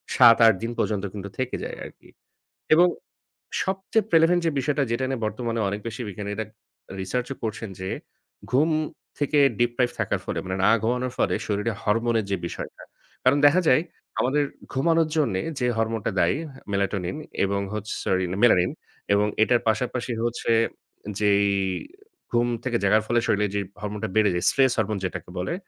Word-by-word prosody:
৭-৮ 115 -2 +8
দিন 115 - -2
পর্যন্ত 105 -2 0
কিন্তু 100 -1 -6
থেকে 130 -1 -2
যায় - - -5
আরকি - - -14 0.7
এবং 175 +2 +6 0.8
সবচেয়ে 195 +3 0
প্রেলেভেন্ট 165 +2 +5
যে - - +3
বিষয়টা, 140 +1 +1
যেটা 125 +3 0
নিয়ে 130 -4 -3
বর্তমানে 115 +1 -2
অনেক 100 +2 -3
বেশি 110 +2 -7
বিজ্ঞানীরা 105 +2 -4 0.6
রিসার্চও 125 +8 -2
করছেন 110 0 -3
যে, 95 - -4 0.6
ঘুম 150 +6 +4 0.5
থেকে 145 0 +1 0.2
ডিপ্রাইভড 120 +1 +1
থাকার - - 0
ফলে - - -3
মানে, 95 0 -3
না - - +6
ঘুমানোর 125 +2 0
ফলে - - +2
শরীরে 105 +2 -1
হরমোনের 115 +1 +1
যে 100 - +1
বিষয়টা। - - -7 0.4
কারণ 135 +3 +5
দেখা 175 +6 +5
যায়, 130 +5 +5 0.4
আমাদের 145 +3 +2 0.3
ঘুমানোর 165 +4 +2
জন্যে 110 -12 +1 0.2
যে 125 - +2
হরমোনটা 110 -1 -1
দায়ী - - +3 0.4
মেলাটনিন 100 +1 -1 0.3
এবং 100 0 0
হচ্ছে 105 0 -4
সরি 95 0 +1 0.2
মেলানিন 90 -7 +5 0.4
এবং 105 +1 +3 0.2
এটার 120 +1 +4
পাশাপাশি 120 +2 -1
হচ্ছে, 120 0 0 0.7
যেই 100 -1 +4 0.8
ঘুম 120 0 +2 0.2
থেকে 120 -2 0
জাগার 105 +2 +4
ফলে 120 0 +2
শরীরে 105 0 +2
যেই 100 -1 0 0.2
হরমোনটা 105 +1 -4
বেড়ে 105 -2 +5
যায়, 90 - -1
স্ট্রেস 130 -2 +3
হরমোন 110 -1 0
যেটাকে 90 - -5
বলে। 90 - -2
115 Hz, 155 wpm, -25 LUFS, 105-130 Hz, 0.8 s, ৭-৮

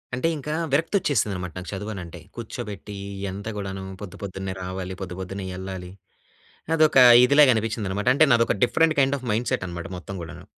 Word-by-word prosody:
అంటే 130 +6 0
ఇంకా 150 +1 -4 0.2
విరక్తి 165 +7 +1
వచ్చేసింది 110 - +1
అనమాట. 90 -1 -5
నాకు 90 - -6
చదువనంటే, 95 -4 -6 0.2
కూర్చోబెట్టీ 105 -3 -7 0.3
ఈ - - -5
అంతా 100 +3 -6
గూడాను 95 -1 -5 0.2
పొద్దు, 100 -4 -8
పొద్దున్నే 95 -1 -4
రావాలి, 95 0 -5
పొద్దు 90 -1 -6
పొద్దున్నే 95 +1 -5
ఎళ్ళాలి. 95 -1 -6 0.9
అదొక 155 -3 +4 0.3
ఇదిలాగా 140 +1 +6
అనిపించింది 110 -2 -2
అనమాట. 105 +4 -1
అంటే, 155 - +6
నాదొక 115 -2 +3
డిఫరెంట్ 160 +5 +2
కైండ్ 135 +1 +3
ఆఫ్ 130 - -10
మైండ్‌సెట్ 120 0 -1
అనమాట 85 -1 -6
మొత్తం 100 +2 -8
గూడాను. 80 - -9
100 Hz, 170 wpm, -24 LUFS, 95-125 Hz, 0.9 s, ఇదిలాగా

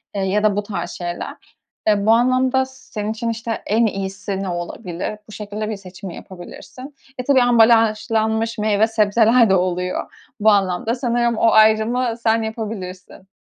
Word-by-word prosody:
eee, 200 - -1
ya 195 +2 0
da 205 -2 +3
bu 205 - -1
tarz 175 -4 -5
şeyler. 175 -1 -7 0.3
Eee, 205 -1 +2
bu 220 - +5
anlamda 255 +2 +3
s 265 0 -19
senin 210 -1 -3
için 230 +1 -3
işte 230 0 -4
en 225 +3 +2
iyisi 195 -1 -3
ne 190 - -3
olabilir? 175 +3 -5
Bu 215 - -13
şekilde 210 +1 -5
bir 220 - -3
seçim 190 0 -10
yapabilirsin. 195 - -11 0.2
E, 250 - -3
tabii 265 -1 +4
ambalajlanmış 225 -1 +2
meyve 215 0 +2
sebzeler 225 +1 +3
de 190 - +4
oluyor 180 0 -2 0.3
bu 215 +1 +4
anlamda. 200 +3 +1
Sanırım 240 -2 0
o 230 - +4
ayrımı 220 +3 +3
sen 225 0 +2
yapabilirsin. 195 -5 -7
215 Hz, 160 wpm, -20 LUFS, 195-230 Hz, 0.3 s, bu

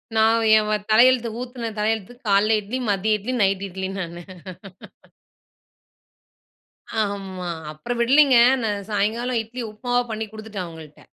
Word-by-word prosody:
நான் 225 +1 +3
ஏன் 210 0 +1
வ - - +1 0.2
தலையெழுத்து 240 +1 +5
ஊத்துன 245 -2 -5
தலையெழுத்துகு 225 +3 -2
காலைல 210 +2 +4
இட்லி, 235 +6 -4
மதிய 210 +2 +1
இட்லி, 250 +6 -4
நைட் 195 0 +1
இட்லி, 190 +1 -5
நானு. 175 -1 -6 2.8
ஆமா. 190 -3 -5 0.2
அப்புறம் 235 +11 -5
விடலீங்க. 270 +1 +5 0.3
நான் 205 -2 -2
சாயங்காலம் 225 +4 0
இட்லி 240 +3 -7
உப்புமாவா 245 +3 -1
பண்ணி 220 0 -3
குடுத்துட்டேன், 215 -4 -6
அவங்கள்ட்ட. 160 -2 -13
215 Hz, 125 wpm, -22 LUFS, 195-240 Hz, 2.8 s, தலையெழுத்து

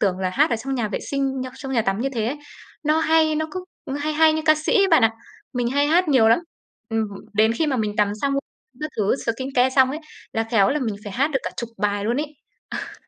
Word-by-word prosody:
tưởng 190 -3 +1
là 185 -1 -1
hát 290 - +2
ở 230 - +2
trong 270 +4 -4
nhà 230 -4 -1
vệ - - -2
sinh, 270 -2 -1
ơ, 255 - -6
trong 270 -1 -6
nhà 230 -3 +2
tắm 195 +1 -1
như 270 - 0
thế 220 -1 0
ấy, 275 +5 -2 0.5
nó 305 +1 +2
hay, 320 -1 +3
nó 315 +1 -1
cứ 370 -1 -5 0.4
hay 305 +1 -1
hay 315 0 +5
như 315 0 -1
ca 310 -1 +6
sĩ, 390 +6 +2
bạn 255 - +6
ạ. 225 - +5 0.4
Mình 245 -2 0
hay 285 +3 +2
hát 340 +2 +3
nhiều 240 -6 +5
lắm, 230 - +5 0.5
ừm, 225 -1 0 0.3
đến 220 +2 +3
khi 310 +7 0
mà 270 -3 0
mình 215 -1 -2
tắm 205 -1 +2
xong 275 0 +1 0.5
các 305 0 -3
thứ, 210 +1 +2
skincare 260 +2 +1
xong 260 0 +6
ấy 305 - -4 0.3
là 225 0 0
khéo 200 -5 +4
là 300 - +1
mình 220 -5 -1
phải 205 - -6
hát 275 +7 +1
được 270 - +1
cả - - -3
10 235 - -4
bài 205 -1 0
luôn 235 +3 0
ấy. 300 +1 -1 0.6
Ờ. - - -12
260 Hz, 255 wpm, -22 LUFS, 225-300 Hz, 0.6 s, ca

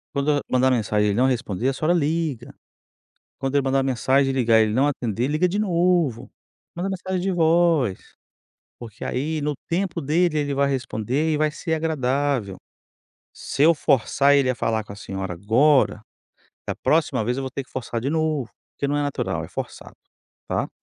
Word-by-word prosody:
Quando 140 +1 0
eu 145 -1 +2
mandar 130 +1 +3
mensagem 105 -4 +1
e - - +2
ele 100 - -1
não 125 - +4
responder, 125 -2 0
a - - -1
senhora 155 +5 0
liga. 150 -5 -2 0.8
Quando 135 +1 -3
ele 140 - +4
mandar 135 0 +1
mensagem 135 +1 +2
e - - -4
ligar 115 -4 +4
e - - +6
ele 105 -1 -1
não 135 +5 +3
atender, 120 -3 -2
liga 155 +5 +2
de 185 +3 -2
novo. 170 - +1 0.5
Manda 180 +3 -2
mensagem 185 -1 -3
de 190 +1 0
voz. 165 - +3 0.8
Porque 115 -3 -11
aí 155 +5 -2
no 150 0 -1
tempo 185 +1 -2
dele 160 +3 +1
ele 145 -1 -2
vai 140 0 +1
responder 130 +3 -1
e - - +1
vai 155 0 +2
ser 160 +2 -5
agradável. 140 - -1 0.8
Se 135 - -3
eu 165 +2 +6
forçar 140 0 +2
ele 140 -2 +3
a 130 - +1
falar 110 -2 -1
com 105 -1 -10
a - - -14
senhora 95 -3 -5
agora, 115 - +3 0.7
da - - -2
próxima 145 -7 +1
vez 125 +3 -1
eu 135 - -3
vou 130 - -4
ter 140 - -4
que 130 - -23
forçar 120 -2 -4
de 135 +4 -2
novo, 155 -5 -1 0.2
porque 140 - -2
não 145 - 0
é - - 0
natural, 145 -1 -2
é - - -10
forçado, - - -7 0.5
tá. - - -1
140 Hz, 195 wpm, -23 LUFS, 120-155 Hz, 0.8 s, e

